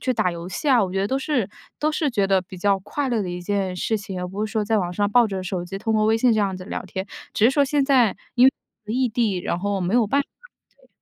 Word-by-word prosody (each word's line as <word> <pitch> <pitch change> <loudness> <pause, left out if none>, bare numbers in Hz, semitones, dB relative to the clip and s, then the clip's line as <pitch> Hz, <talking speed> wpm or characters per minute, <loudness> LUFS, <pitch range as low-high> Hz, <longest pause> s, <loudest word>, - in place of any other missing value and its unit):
去 255 - 0
打 215 -6 +1
游 170 0 -7
戏 190 +11 -3
啊， 245 -6 +5
我 185 - -5
觉 195 - 0
得 195 - +1
都 265 - 0
是 260 -7 -1 0.3
都 305 - +1
是 305 -2 0
觉 200 -4 +1
得 190 -1 +2
比 185 0 -11
较 195 +1 +2
快 270 +8 -3
乐 235 -4 0
的 180 - -4
一 175 - -5
件 190 0 -1
事 220 +4 -1
情。 195 -3 -6
而 180 - -4
不 205 +3 -3
是 215 - -6
说 220 -2 +1
在 220 +1 +1
网 175 -2 -2
上 205 +2 0
抱 240 +1 +5
着 190 -2 -4
手 180 -1 -3
机 195 +2 -6
通 220 +1 -1
过 215 - +3
微 220 +1 +3
信 245 +1 +4
这 220 - +1
样 195 -2 0
子 185 - -9
聊 - - -4
天。 190 +1 -5 0.3
只 215 - +1
是 - - +5
说 285 +1 +3
现 285 +1 +1
在 255 -7 +4 0.2
因 250 +1 +6 0.4
为 215 +2 -4
异 255 -1 +2
地， 220 -5 0
然 175 - -2
后 200 0 -1
没 180 +5 -1
有 235 -3 +4
办 280 +7 +2
法。 - - -26 0.5
对。 - - -26
205 Hz, 320 characters per minute, -23 LUFS, 190-245 Hz, 0.5 s, 因